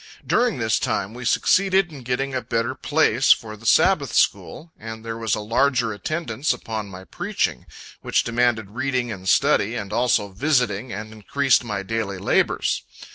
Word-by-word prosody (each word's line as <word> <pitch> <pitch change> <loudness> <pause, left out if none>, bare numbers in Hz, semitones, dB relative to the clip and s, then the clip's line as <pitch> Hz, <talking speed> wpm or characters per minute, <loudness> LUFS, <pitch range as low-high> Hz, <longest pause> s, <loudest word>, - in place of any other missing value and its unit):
During 240 -2 +2
this 110 -5 +1
time 100 +3 -2
we 125 0 -8
succeeded 190 +7 +2
in 145 -3 -10
getting 125 +2 -2
a 130 - -1
better 115 +1 -1
place 140 -3 +2
for 110 -1 +2
the 110 +1 -8
Sabbath 155 - +3
school, 165 +1 0
and 110 0 -8
there 115 0 -4
was 115 -1 -1
a - - -4
larger 120 +1 +1
attendance 140 - -2
upon 110 -2 -5
my 95 -1 -10
preaching, 60 - -3 0.3
which - - +1
demanded 115 -3 0
reading 125 -1 -2
and 95 -3 -4
study, 110 +4 +3
and 105 -3 -5
also 115 -3 +1
visiting, 125 0 0
and 110 +1 -7
increased 125 +4 +1
my 105 -4 -4
daily 105 -2 -3
labors. 95 - +1
115 Hz, 165 wpm, -22 LUFS, 105-135 Hz, 0.3 s, Sabbath